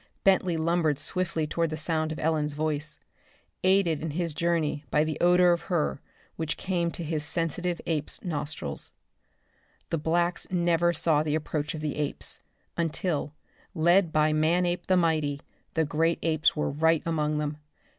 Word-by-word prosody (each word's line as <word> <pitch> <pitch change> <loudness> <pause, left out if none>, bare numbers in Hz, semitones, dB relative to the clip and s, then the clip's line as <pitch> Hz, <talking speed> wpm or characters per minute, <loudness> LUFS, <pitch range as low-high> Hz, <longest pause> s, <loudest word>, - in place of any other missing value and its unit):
Bentley 185 -3 +3
lumbered 160 -2 +1
swiftly 170 0 -1
toward 165 +2 -1
the 155 - -4
sound 155 0 0
of 155 - -4
Ellen's 150 -2 0
voice, 150 0 -2 0.7
aided 185 -4 +3
in 160 - -3
his 165 +1 -2
journey 165 -3 0
by 150 - +3
the 155 -1 -2
odor 180 0 +5
of 170 - -2
her 160 -5 0 0.4
which 160 -2 -2
came 175 -3 -1
to 170 - -6
his 155 -1 -2
sensitive 170 +2 -1
ape's 155 -3 -2
nostrils. 150 - -1 1.0
The 165 - 0
blacks 170 +3 0
never 175 -1 +2
saw 155 -2 +3
the 150 -1 0
approach 155 +1 -2
of 155 - -6
the 150 -2 -3
apes, 150 -1 -3 0.4
until, 165 -2 -1 0.4
led 170 +2 +4
by 155 0 +3
Manape 175 +3 +1
the 185 - +4
Mighty, 155 -4 +1 0.4
the 160 -1 +2
great 165 +3 +1
apes 155 -1 +2
were 150 - -1
right 160 +2 +2
among 155 -2 0
them. 150 0 -2
160 Hz, 155 wpm, -27 LUFS, 150-170 Hz, 1.0 s, odor